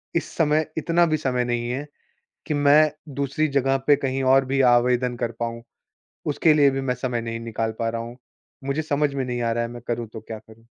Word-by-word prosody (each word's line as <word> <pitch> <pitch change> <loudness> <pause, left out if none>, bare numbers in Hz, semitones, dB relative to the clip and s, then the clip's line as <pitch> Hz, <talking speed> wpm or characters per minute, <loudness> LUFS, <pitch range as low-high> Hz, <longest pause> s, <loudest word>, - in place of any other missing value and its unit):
इस 165 -1 -1
समय 155 -1 +2
इतना 170 +2 +3
भी 155 -1 +1
समय 125 -4 -1
नहीं 120 0 -2
है 135 +4 -3 0.6
कि 150 - -1
मैं 145 +1 +5 0.3
दूसरी 140 +2 0
जगह 135 0 +2
पे 145 - +6
कहीं 135 -1 -2
और 135 0 +4
भी 135 +1 0 0.2
आवेदन 125 0 +1
कर 120 -1 -2
पाऊँ। 115 0 -3 0.6
उसके 155 +2 +3
लिए 145 -2 +5
भी 135 0 -2
मैं 130 -1 0
समय 125 -1 -2
नहीं 115 0 -4
निकाल 115 -1 -3
पा 115 - 0
रहा 115 0 -4
हूँ। 120 +1 -9 0.5
मुझे 140 +3 -1
समझ 145 -2 0
में 135 -1 -1
नहीं 125 -1 -3
आ 115 -1 0
रहा 120 +1 0
है, 115 - -5
मैं 120 -1 -9
करूँ 120 -1 -2
तो 110 - -7
क्या 110 0 -8
करूँ। 110 +1 -19
130 Hz, 220 wpm, -23 LUFS, 120-145 Hz, 0.6 s, पे